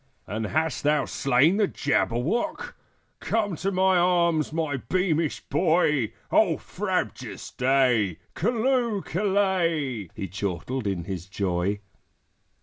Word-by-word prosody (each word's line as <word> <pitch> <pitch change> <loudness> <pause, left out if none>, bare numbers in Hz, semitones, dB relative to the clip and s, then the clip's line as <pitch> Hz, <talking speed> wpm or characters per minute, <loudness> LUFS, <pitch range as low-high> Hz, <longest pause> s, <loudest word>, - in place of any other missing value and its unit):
"And 110 +2 -3
hast 160 +2 0
thou 150 -1 +2
slain 140 +8 +3
the 210 -2 +3
Jabberwock? 155 - -1 0.5
Come 205 -5 -1
to 195 +5 -1
my 190 0 +3
arms, 170 -3 +2
my 155 -3 -1
beamish 165 0 0
boy! 150 - +2 0.2
O 175 -8 +4
frabjous 185 - -4
day! 125 - +2 0.2
Callooh! 235 0 +1
Callay!" 170 - 0
He 95 - -4
chortled 100 +6 -3
in 95 -4 -2
his 90 -1 -6
joy. 95 0 -1
155 Hz, 110 wpm, -26 LUFS, 115-185 Hz, 0.5 s, O